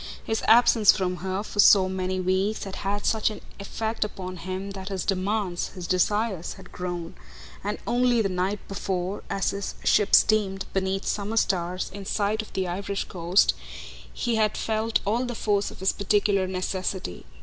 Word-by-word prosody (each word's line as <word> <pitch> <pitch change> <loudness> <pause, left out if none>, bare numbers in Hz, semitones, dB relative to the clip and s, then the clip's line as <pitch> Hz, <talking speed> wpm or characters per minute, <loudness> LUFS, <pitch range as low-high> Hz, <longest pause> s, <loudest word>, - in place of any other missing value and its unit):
His 220 - -1
absence 225 -2 +7
from 180 -2 -1
her 190 +3 -3
for 210 - -8
so 195 -2 +7
many 185 0 -2
weeks 185 +3 0
had 195 -1 -6
had 200 +1 -2
such 220 -1 +2
an 215 - -7 0.2
effect 220 +3 -2
upon 185 -3 -6
him 190 +3 -5
that 195 0 -7
his 190 -3 -3
demands, 195 -1 -1
his 180 -2 -6
desires 190 0 0
had 190 -2 -14
grown; 175 -2 -5 0.5
and 205 +1 -2
only 245 0 +2
the 215 - +2
night 185 +2 -2
before, 190 0 -3
as 195 - 0
his 200 0 -4
ship 205 - +4
steamed, 200 -3 +3
beneath 190 0 -1
summer 210 +2 -2
stars, 180 -3 0
in 200 -1 -7
sight 210 +1 0
of 215 - -12
the 190 -1 -1
Irish 195 +2 -2
coast, 175 +2 +2 0.6
he 235 -2 -1
had 215 -1 +1
felt 220 +1 0
all 225 +5 +1
the 245 -1 -4
force 205 -2 0
of - - -13
his 190 - +2
particular 200 -1 +1
necessity. 185 - -3
195 Hz, 170 wpm, -26 LUFS, 185-210 Hz, 0.6 s, absence